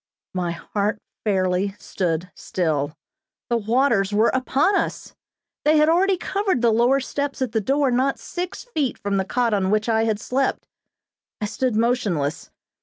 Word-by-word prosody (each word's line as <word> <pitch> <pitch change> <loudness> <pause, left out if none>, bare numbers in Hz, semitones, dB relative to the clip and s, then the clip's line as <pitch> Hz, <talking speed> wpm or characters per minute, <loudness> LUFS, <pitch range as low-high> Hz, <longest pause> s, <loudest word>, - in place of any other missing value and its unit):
My 180 -2 -1
heart 205 +4 -2 0.3
fairly 190 -1 +1
stood 175 -1 -2
still. 155 -4 -2 0.5
The 235 - +3
waters 225 -2 +2
were 215 +3 +4
upon 270 +8 +2
us! - - -2 0.5
They 305 +1 +4
had 305 +1 +5
already 375 +3 +3
covered 385 - -1
the 235 - +5
lower 240 +5 +3
steps 280 +1 -3
at 260 -4 -1
the 220 0 0
door 275 +4 +2
not 260 +3 +1
six 360 0 -5
feet 310 - -2
from 200 -1 -1
the 190 - 0
cot 240 +1 0
on 190 -2 +1
which 215 +2 +1
I 225 -1 +2
had 215 -2 0
slept. 260 +3 -1 0.7
I 210 - -1
stood 250 +2 -1
motionless. 215 - 0
230 Hz, 160 wpm, -23 LUFS, 195-270 Hz, 0.7 s, had